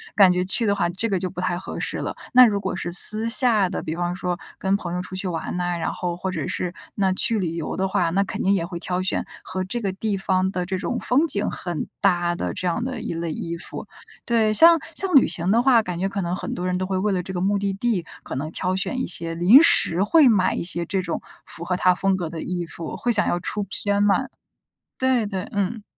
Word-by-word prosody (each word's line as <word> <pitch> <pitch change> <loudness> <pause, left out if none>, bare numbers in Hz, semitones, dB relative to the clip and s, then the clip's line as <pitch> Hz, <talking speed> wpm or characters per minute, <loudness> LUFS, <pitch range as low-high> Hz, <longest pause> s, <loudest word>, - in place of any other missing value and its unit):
感 195 -3 +7
觉 180 0 +1
去 220 +4 +2
的 200 - +2
话 200 - +1
这 210 +6 -2
个 195 - +1
就 185 - -2
不 180 - -6
太 175 -1 -1
合 185 - -7
适 - - -2
了。 - - -4 0.2
那 255 0 +9
如 205 -3 +1
果 - - -3
是 175 -2 -4
私 215 +5 +4
下 230 -4 +3
的， 185 - -3
比 160 - -4
方 175 +1 -2
说 180 -1 -3 0.2
跟 190 +1 +1
朋 175 -4 -4
友 180 - -2
出 185 0 -8
去 190 +1 -3
玩 170 0 -3
呐， 175 0 -1
然 165 - -2
后 180 - -3
或 190 +1 -3
者 160 -6 -3
是 180 -1 -3 0.2
那 195 -2 +1
去 225 +3 +1
旅 170 -3 -2
游 165 - -4
的 190 0 +1
话， 175 -3 +1
那 195 +3 +2
肯 - - -5
定 195 - +3
也 170 -4 0
会 175 -1 -6
挑 180 +1 -2
选 185 - -1 0.2
和 185 - -4
这 195 +6 -3
个 195 -3 -1
地 200 +1 -2
方 190 0 0
的 180 -2 -2
这 190 +1 -2
种 240 +6 -2
风 275 +6 +2
景 210 -8 0
很 175 -4 -4
搭 175 -3 +2
的 - - -3
这 185 -1 -3
样 180 +7 -1
的 260 0 -4
一 - - -4
类 165 0 -3
衣 170 +2 -4
服。 170 - -7 0.4
对， 225 -2 +2
像 335 +9 +7 0.2
像 385 -2 -2
旅 265 - +8
行 175 +1 -2
的 230 - +4
话， 245 -2 +5
感 180 -5 -5
觉 190 - 0
可 200 0 -3
能 175 0 -2
很 - - -5
多 180 - -4
人 180 0 0
都 185 - -2
会 190 0 -2
为 205 +2 0
了 180 -1 -1
这 190 - -7
个 180 - -2
目 200 +2 +2
的 200 0 -1
地， 200 -3 -1 0.2
可 - - -6
能 150 +4 -4
挑 185 +2 -1
选 225 +7 -2
一 - - -1
些 170 -1 -3
临 185 - +7
时 185 - +3
会 300 +7 +5
买 205 -6 +3
一 - - -3
些 175 -1 -3
这 190 +2 -1
种 170 -2 -4 0.2
符 170 - -8
合 180 +1 -1
它 180 0 +4
风 195 +1 +1
格 170 -3 -3
的 160 -1 -6
衣 175 -1 -3
服， 165 -1 -7
会 245 - 0
想 210 - +2
要 175 - 0
出 205 +4 -3
片 200 +1 -1
嘛。 205 +6 +2 0.7
对 260 -3 +2
对， 195 -3 -4
嗯。 205 +2 -2
185 Hz, 280 characters per minute, -23 LUFS, 175-210 Hz, 0.7 s, 那